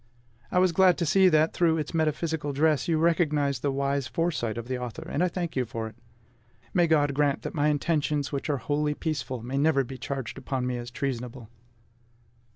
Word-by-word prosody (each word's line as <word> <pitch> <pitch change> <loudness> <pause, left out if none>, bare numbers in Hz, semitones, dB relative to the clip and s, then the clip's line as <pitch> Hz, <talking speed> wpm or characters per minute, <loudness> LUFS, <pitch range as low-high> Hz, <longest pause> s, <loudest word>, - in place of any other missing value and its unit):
I - - 0
was 185 0 +4
glad 185 +1 +4
to 170 - 0
see 190 +4 +5
that 155 -1 +3
through 165 -2 +2
its 155 - -4
metaphysical 155 -2 -1
dress 150 -1 +2
you 165 -2 +2
recognized 150 -5 +1
the 140 - 0
wise 140 0 -1
foresight 130 -7 -1
of 115 0 -5
the 130 -1 -2
author; 125 -3 -6
and 170 - 0
I - - +3
thank 175 -2 -4
you 130 - +1
for 115 -1 -5
it. 110 - -11 0.8
May 175 -2 +4
God 145 -3 +3
grant 145 0 +1
that - - -5
my 150 -2 +1
intentions, 150 -1 0
which 140 +1 -3
are 145 - +1
wholly 150 +4 -1
peaceful, 135 -7 -3
may 130 +3 -2
never 145 -2 +3
be 130 +1 -8
charged 135 0 -5
upon 130 -2 -2
me 125 -1 -1
as 120 0 -6
treasonable! 125 -2 -4
145 Hz, 200 wpm, -27 LUFS, 130-160 Hz, 0.8 s, see